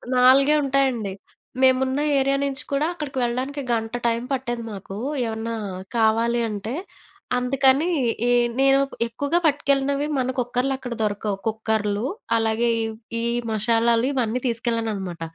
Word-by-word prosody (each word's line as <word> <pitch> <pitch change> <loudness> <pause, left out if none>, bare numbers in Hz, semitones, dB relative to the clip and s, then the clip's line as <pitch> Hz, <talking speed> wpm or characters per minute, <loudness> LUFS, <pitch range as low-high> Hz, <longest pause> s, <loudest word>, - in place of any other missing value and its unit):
నాలుగే 265 +3 +6
ఉంటాయండి. 265 -7 +1 0.5
మేమున్న 260 +1 +3 0.2
ఏరియా 275 +1 +2
నించి 280 0 -2
కూడా 280 +2 +2
అక్కడకు 295 -6 -6
వెళ్ళడానికి 260 +4 -2
గంట 225 -1 -1
టైమ్ 235 +1 0
పట్టేది 240 -3 -3
మాకూ, 195 -1 -8 0.3
ఏమన్నా 225 0 -3 0.4
కావాలి 230 +2 +2
అంటే. 215 +2 -4 0.6
అందుకనీ 265 +5 +3 0.4
ఈ - - +3 0.3
నేను 270 0 +5 0.3
ఎక్కువుగా 285 +8 0
పట్టుకెళ్ళినవి 280 -1 +1
మన 255 0 0
కుక్కర్లక్కడ 250 +1 -1
దొరకవు. 205 -1 -1
కుక్కర్లు 220 -1 -1 0.3
అలాగే, 225 +1 +1 0.2
ఇ‌వ్ 220 0 -5 0.3
ఈ - - -3 0.3
మషాలాలు 230 +2 +2
ఇవన్నీ 250 -2 -1
తీసుకెళ్ళాననమాట. 225 -7 -1
240 Hz, 115 wpm, -23 LUFS, 225-270 Hz, 0.6 s, నాలుగే